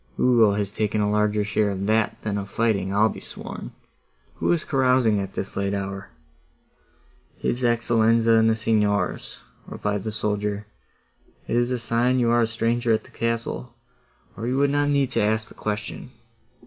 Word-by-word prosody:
Ugo 115 -5 +5
has 100 -1 -2
taken 105 0 -1
a 105 0 +1
larger 105 0 +1
share 105 0 +1
of 100 0 -3
that 110 +1 +1
than 105 -2 -1
of 100 0 -6
fighting, 100 -5 0
I'll 105 +2 +4
be - - -6
sworn. - - -8 0.7
Who - - +1
is 170 -2 +1
carousing 125 -5 +2
at 95 -1 -5
this 95 - -5
late 100 0 -1
hour?" 95 0 -5 1.3
"His 120 - -2
Excellenza 115 -1 +3
and 110 0 +4
the 110 - +2
Signors," 105 -3 0 0.3
replied 105 -2 -3
the 110 - -3
soldier: 105 0 -2 0.8
"it - - -1
is 120 0 +2
a 125 - 0
sign 120 +2 +1
you 120 -2 +2
are 120 0 +4
a 115 - +2
stranger 115 +1 0
at 110 - +2
the - - -18
castle, 115 +1 -3 0.6
or 115 +3 -5
you 130 +2 0
would 140 0 +3
not 145 0 +1
need 140 -2 +1
to - - +1
ask 110 +1 +1
the - - -13
question. 105 0 -5
110 Hz, 175 wpm, -24 LUFS, 105-120 Hz, 1.3 s, Ugo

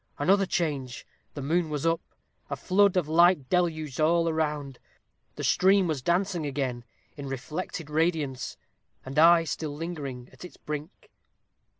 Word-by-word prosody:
another 195 +6 +3
change! 140 -9 -2 0.3
The 145 - -5
moon 165 +3 +1
was 150 0 -3
up 165 0 +2 0.5
a - - -2
flood 195 0 +3
of 175 -5 +1
light 170 -3 +4
deluged 155 -5 0
all 165 +2 +3
around 150 -4 -2 0.6
the - - -6
stream 190 +1 +4
was 155 -6 -2
dancing 175 +2 0
again 130 -4 -3 0.3
in 140 -1 -6
reflected 150 +5 -5
radiance, 150 -4 -1 0.5
and 135 +3 -2
I 165 +1 +7
still 155 -1 -4
lingering 145 -6 -6
at - - -13
its 180 - -11
brink. 150 +4 -7
155 Hz, 140 wpm, -27 LUFS, 145-175 Hz, 0.6 s, I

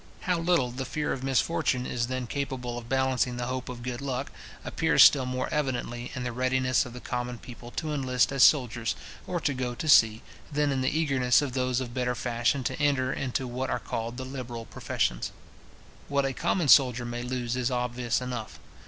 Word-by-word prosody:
How 180 -2 0
little 165 -7 +2
the 130 +2 -4
fear 150 +3 -2
of 130 - -6
misfortune 135 -1 +1
is 120 -2 -1
then 130 0 -3
capable 125 -2 -3
of 120 -1 -8
balancing 130 -2 +1
the 120 - -2
hope 130 0 -4
of 120 -1 -7
good 125 0 -4
luck, 135 0 -3 0.3
appears - - +4
still 130 -3 +6
more 130 0 -2
evidently 125 -4 -2
in 130 - -3
the 120 - -2
readiness 130 +1 +1
of 120 - -10
the 125 - -7
common 125 0 -4
people 120 +1 -11
to 155 -2 -2
enlist 130 -3 +1
as 135 -1 0
soldiers, 120 -5 +4 0.3
or 175 - -1
to 145 - +1
go 125 -1 -3
to 155 - -5
sea, 115 -5 +6 0.3
than 145 0 +1
in 135 -1 0
the 130 - +2
eagerness 135 -4 +3
of 135 -3 -3
those 130 -1 0
of 120 -2 -5
better 125 -1 -1
fashion 120 +3 0
to 135 - -3
enter 140 -3 +2
into 130 0 -2
what 125 +2 -3
are - - 0
called 115 0 -4
the 130 - -5
liberal 125 -3 -6
professions. - - -2 0.8
What 140 -1 +1
a 135 - -1
common 170 +4 0
soldier 125 -3 +6
may 120 0 -4
lose 125 -1 -2
is 125 -1 0
obvious 125 -1 -1
enough. 125 -3 -5
125 Hz, 200 wpm, -28 LUFS, 120-135 Hz, 0.8 s, still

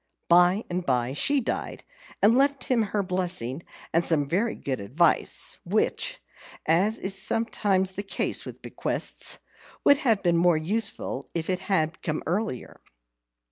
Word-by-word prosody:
By 180 +4 +5
and 180 +1 -3
by 125 -3 0
she 280 - +2
died, 230 - -4 0.4
and 220 +3 +6
left 275 +1 +2
him 250 -3 +2
her 205 -1 -1
blessing 180 -8 -2 0.3
and 165 +1 +3
some 155 -4 +2
very 200 +10 0
good 130 -2 -4
advice, 155 - +1
which - - 0 0.5
(as 190 +8 +3
is 195 0 -3
sometimes 195 -2 0
the 200 - -3
case 200 - -1
with - - -10
bequests) - - -3 0.5
would 285 - +6
have 225 -9 +2
been 170 -2 +3
more 175 -1 +4
useful 190 - -1
if 165 +2 -1
it 185 - 0
had 165 -5 -1
come 155 -1 -3
earlier. 175 - -3
180 Hz, 145 wpm, -26 LUFS, 160-210 Hz, 0.5 s, and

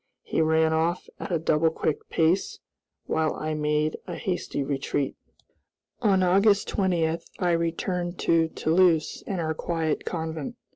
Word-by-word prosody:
He - - 0
ran 160 0 +3
off 165 +2 0
at 205 - -6
a 170 - +2
double 160 0 +2
quick 160 -1 -2
pace, 165 +4 +1 0.5
while 160 -1 0
I 155 0 -3
made 150 0 0
a 175 - -4
hasty 180 -6 -2
retreat. 140 0 -2 0.8
On 195 -5 +3
August 200 +3 +4
20, 170 -4 +1 0.2
I 180 -2 +1
returned 175 +1 -1
to 165 -1 +3
Toulouse 165 0 +2
and 190 -3 -2
our 160 -1 -1
quiet 160 -1 -2
convent. 160 +3 -4
165 Hz, 140 wpm, -26 LUFS, 160-180 Hz, 0.8 s, August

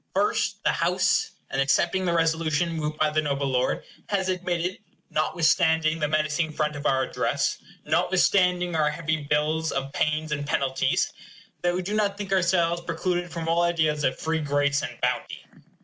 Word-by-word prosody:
First, - - 0
the - - +3
House, - - +1 0.2
in 135 - 0
accepting 170 +7 +2
the 170 - +1
resolution 165 0 +1
moved 155 -1 -3
by 155 -1 +2
the 155 0 +1
noble 140 -2 -1
lord, 130 -1 0 0.3
has 190 -2 0
admitted, 180 -1 -2 0.3
notwithstanding 160 0 +2
the 150 - +1
menacing 155 +1 0
front 150 -1 -1
of 145 - -2
our 130 -1 +2
address, 130 - -1 0.3
notwithstanding 180 -2 +2
our 155 -1 +3
heavy 160 0 -2
bills 155 +2 +1
of 135 +1 -3
pains 155 0 0
and 145 -1 -2
penalties 135 -2 0 0.5
that 175 0 +1
we 185 - -2
do 200 +4 -3
not 205 -2 0
think 200 -1 -3
ourselves 170 -2 +2
precluded 175 +1 -2
from 165 0 -5
all 165 +1 +2
ideas 160 -3 +1
of 130 - +1
free 160 0 -1
grace 145 -1 +1
and - - -6
bounty. - - -2
160 Hz, 165 wpm, -25 LUFS, 150-175 Hz, 0.5 s, the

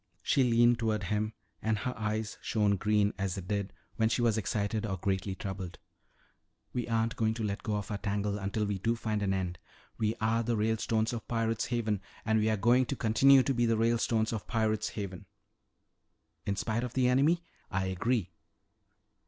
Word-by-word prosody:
She 135 - +3
leaned 120 0 +4
toward 110 -3 0
him 105 +3 -1 0.3
and 110 -1 +1
her 125 +5 -3
eyes 110 -1 -3
shone 105 -2 +2
green 105 +1 +2
as 95 -2 -1
they 95 - -4
did 100 +1 -2 0.3
when 110 -1 +3
she 120 +1 +1
was 115 -3 +3
excited 110 0 -1
or 95 -3 -2
greatly 95 +1 -1
troubled. 95 -3 -6 1.0
"We 120 -2 -2
aren't 115 0 0
going 110 0 +1
to 115 - -3
let 100 -1 -2
go 110 -4 -2
of 105 -1 -4
our 100 - -2
tangle 100 +1 -1
until 100 +2 -1
we 100 -1 -2
do 115 +5 +1
find 110 -2 -2
an 100 -1 +1
end. 90 -3 -2 0.4
We 110 0 +1
are 110 +1 +2
the 115 0 0
Ralestones 110 +1 +1
of 115 - -5
Pirate's 115 -1 0
Haven 110 -5 -1 0.2
and 110 0 +3
we 110 +1 +2
are 110 - +1
going 120 +5 +4
to 140 - -2
continue 130 +4 +5
to 135 - +1
be 120 -1 +2
the 115 -1 +2
Ralestones 115 -1 +1
of 110 - -4
Pirate's 110 -2 0
Haven." 95 -4 -6 1.2
"In 100 - +1
spite 110 +3 -1
of 125 -1 -5
the 130 -1 +3
enemy? 145 +7 +3 0.3
I 95 0 -1
agree." 95 +1 0
110 Hz, 190 wpm, -31 LUFS, 100-115 Hz, 1.2 s, continue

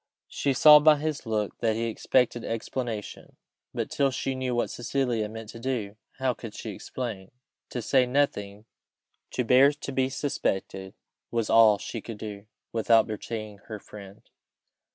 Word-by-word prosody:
She 140 - 0
saw 150 +3 +9
by 150 0 +6
his 150 -3 -3
look 105 -2 -2
that 110 -2 +1
he 115 - -2
expected 120 +1 +1
explanation; 115 -1 -5 0.4
but - - -4
till 140 -1 +2
she 135 +1 -2
knew 130 -1 -2
what 120 - 0
Cecilia 120 -3 -1
meant 110 0 -8
to 115 - -9
do, 115 -5 -3 0.2
how 130 -1 0
could 115 -3 -9
she - - -6
explain? 110 -7 -6 0.4
To 120 - -4
say 130 +2 +3
nothing 105 -6 -1 0.6
to 125 - -1
bear 130 +4 +6
to 145 -1 -7
be 130 -1 +1
suspected, 95 -8 -3 0.3
was 115 -2 -1
all 110 -2 +7
she 115 +2 -6
could 115 0 -8
do, 105 -1 -8 0.2
without 115 0 +4
betraying 110 -1 -6
her 110 - -5
friend. 100 -1 -12
115 Hz, 155 wpm, -27 LUFS, 105-130 Hz, 0.6 s, saw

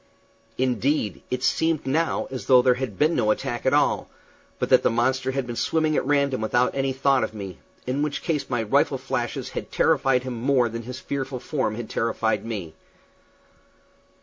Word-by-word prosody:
Indeed, 125 - 0
it 125 0 -2
seemed 160 0 +1
now 160 +5 0
as 130 - -6
though 125 -1 +6
there 125 -1 +5
had 125 -5 -5
been 155 +3 +3
no 105 - +1
attack 120 +2 -1
at 130 - +3
all, 145 - +1 0.5
but - - -2
that - - +6
the - - +3
monster 130 +3 +1
had 135 -1 -1
been 120 -1 -5
swimming 155 +4 +1
at - - +1
random 140 -4 +1
without 120 +3 +1
any 135 0 0
thought 135 -1 +2
of 110 - -4
me, 100 -3 -7 0.3
in 130 +3 -1
which 150 -1 -2
case 155 -4 -1
my 120 -3 0
rifle 105 - +2
flashes - - -3
had - - -6
terrified 125 -2 +2
him 130 -1 -4
more 125 -2 +3
than 115 +1 -5
his 125 +2 -7
fearful 135 -1 -4
form 130 -4 -2
had 120 0 -5
terrified 110 -1 -1
me. 100 -9 -5
130 Hz, 185 wpm, -24 LUFS, 115-140 Hz, 0.5 s, though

